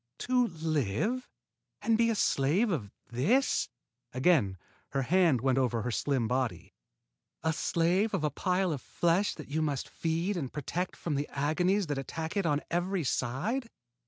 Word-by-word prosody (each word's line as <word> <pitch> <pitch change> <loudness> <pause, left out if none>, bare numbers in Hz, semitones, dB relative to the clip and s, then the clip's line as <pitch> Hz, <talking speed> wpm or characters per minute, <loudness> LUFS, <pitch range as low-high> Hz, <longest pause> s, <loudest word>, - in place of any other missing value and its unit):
"To 250 -1 +2
live 160 - -1 0.5
and 225 - +2
be 230 +1 +3
a 225 - +1
slave 180 - +2
of 120 - -2 0.2
this?" 200 - +2 0.4
Again 130 - +3 0.4
her 135 -1 +1
hand 165 -4 +3
went 130 0 +2
over 120 -4 +1
her 125 - -1
slim 130 -1 0
body. 125 0 -2 0.7
"A 160 0 +2
slave 175 +7 +1
of 170 - -2
a 150 - +1
pile 180 +4 +1
of 140 - -5
flesh 175 +4 +1
that 155 - -9
you 155 +2 0
must 145 -4 -1
feed 170 +4 -1
and 135 -7 -3
protect 170 +5 -3
from 165 - -3
the 145 +1 -1
agonies 180 +8 +1
that 145 -3 -2
attack 160 +5 -5
it 195 -4 +1
on 150 -1 +1
every 175 +1 0
side? 175 - -1
160 Hz, 160 wpm, -30 LUFS, 135-190 Hz, 0.7 s, be